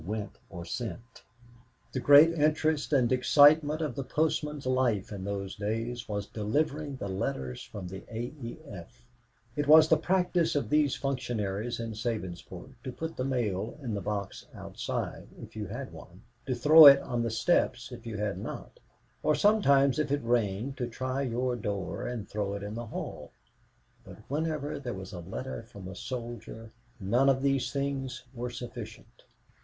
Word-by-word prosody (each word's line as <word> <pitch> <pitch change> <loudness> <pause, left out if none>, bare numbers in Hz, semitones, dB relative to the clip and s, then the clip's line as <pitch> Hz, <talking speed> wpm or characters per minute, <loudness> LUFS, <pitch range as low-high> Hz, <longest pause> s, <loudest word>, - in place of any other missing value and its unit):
went 105 +2 -5
or 85 -3 -8
sent. 115 +3 -6 0.7
The 130 - -2
great 145 +5 +8
interest 155 -1 +1
and 130 -4 +3
excitement 145 +4 +5
of 155 - -1
the 140 - -4
postmen's 150 0 -1
life 125 -7 +1
in 100 -2 -6
those 100 -1 -3
days 115 +3 -3
was 100 -1 -2
delivering 140 +7 -1
the 100 - -5
letters 65 -10 -3
from 95 -3 -8
the 95 +1 -7
A. 120 +4 -4
E. 115 0 -6
F. 85 - -11 0.5
It 145 -1 -1
was 155 +1 +8
the 160 - +6
practice 180 -1 +1
of 145 - -1
these 150 -2 +3
functionaries 120 -5 -2
in 115 -1 -4
Sabinsport 105 -2 -5
to 130 - -4
put 160 +5 -5
the 130 - -2
mail 115 -5 -1
in 125 -6 -4
the 100 - -2
box 100 0 -4
outside, - - -5
if - - -11
you 105 -2 -4
had 130 +6 -6
one; 90 +5 -13 0.2
to 130 - 0
throw 150 +5 +9
it 140 0 +10
on 120 -1 -2
the 115 - 0
steps 120 -1 +1
if 120 -1 -9
you 110 -2 -4
had 105 -1 -2
not; - - -7 0.4
or 155 - +2
sometimes, 140 -10 +4
if 150 -2 0
it 145 -2 0
rained, 115 +2 0
to 125 - -2
try 130 +3 -3
your 125 -1 -1
door 100 -3 -3
and 120 -5 -4
throw 100 -1 -2
it 100 - -6
in 105 +1 -5
the 120 +1 -5
hall; - - -6 0.7
but - - -12
whenever 150 0 -2
there 125 -5 -5
was 95 +1 -8
a 90 - -6
letter 95 +11 -6
from 100 -5 -11
a 95 - -8
soldier 115 -1 -7 0.3
none 120 +8 +3
of 135 0 +2
these 135 -3 +1
things 135 -1 -3
were 125 0 -4
sufficient. 120 -2 -9
120 Hz, 170 wpm, -29 LUFS, 105-140 Hz, 0.7 s, it